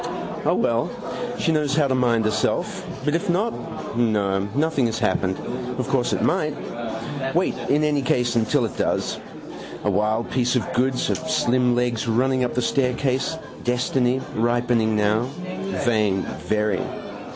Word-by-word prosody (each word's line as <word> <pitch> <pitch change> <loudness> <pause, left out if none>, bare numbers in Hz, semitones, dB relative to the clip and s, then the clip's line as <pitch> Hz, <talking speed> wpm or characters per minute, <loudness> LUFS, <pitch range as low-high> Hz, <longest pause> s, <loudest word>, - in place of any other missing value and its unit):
O, - - +4
well: - - +1 0.5
she - - +1
knows 150 -3 +1
how 150 -2 +3
to 130 - +1
mind 120 -3 +2
herself. 110 0 0 0.2
But 150 - +1
if 175 +4 0
not? 205 +7 +1 0.4
No, 105 -5 +2 0.2
nothing 145 -4 +2
has 115 0 -2
happened. 95 -4 +1 0.4
Of - - -2
course - - +1
it - - 0
might. - - +1 0.8
Wait 180 +2 +2 0.2
in 150 +2 +3
any 150 -2 +2
case 125 -2 +1
till 145 -5 +3
it - - -5
does. - - 0 0.6
A 105 - +2
wild 110 +4 0
piece 125 0 +1
of 125 - -1
goods. 130 +1 +1
Her - - +3
slim 125 0 +2
legs 120 -2 0
running 130 +3 +2
up 125 - -1
the 125 - +1
staircase. 130 +3 +1 0.3
Destiny. 125 +1 +1 0.2
Ripening 120 -1 +2
now. 105 +3 +2 0.6
Vain: 105 -5 +2 0.2
very. 105 -3 +1
120 Hz, 150 wpm, -23 LUFS, 110-135 Hz, 0.8 s, O